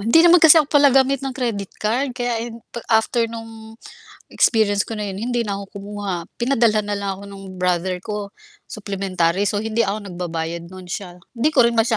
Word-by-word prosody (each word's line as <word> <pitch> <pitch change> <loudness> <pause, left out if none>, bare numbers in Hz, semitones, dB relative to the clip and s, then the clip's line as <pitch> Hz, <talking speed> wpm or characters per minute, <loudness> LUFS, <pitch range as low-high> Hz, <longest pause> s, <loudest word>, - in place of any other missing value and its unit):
hindi 230 +11 +5
naman 345 0 +7
kasi 320 0 +8
ako 310 - +6
pala 290 0 +5
gamit 270 0 +3
ng 270 - -3
credit 225 -7 -2
card 245 +4 -1
kaya, 240 -1 -2
eh, - - -9 0.4
after 230 +1 +2
no'ng 225 -1 -10 0.5
experience 205 -3 +2
ko - - -8
na 210 -2 -3
'yon 195 - -5
hindi 240 +3 -1
na 205 -4 -2
ako 200 - -6 0.2
kumuha, 205 -1 -4 0.2
pinadalhan 235 -4 +2
na 205 - -4
lang 200 -1 -2
ako 200 - -12
nung 195 -1 -10
brother 180 0 0
ko,- 210 -2 -4 0.4
supplementary- 195 -2 -1
so - - -1
hindi 225 +1 -1
ako 205 -1 -1
nagbabayad 170 -2 -5
no'n 185 0 -11
siya. 180 0 -6 0.2
Hindi 250 +5 +1
ko 275 -6 +4
rin 235 - +3
masya 225 0 +2
215 Hz, 195 wpm, -21 LUFS, 195-235 Hz, 0.5 s, kasi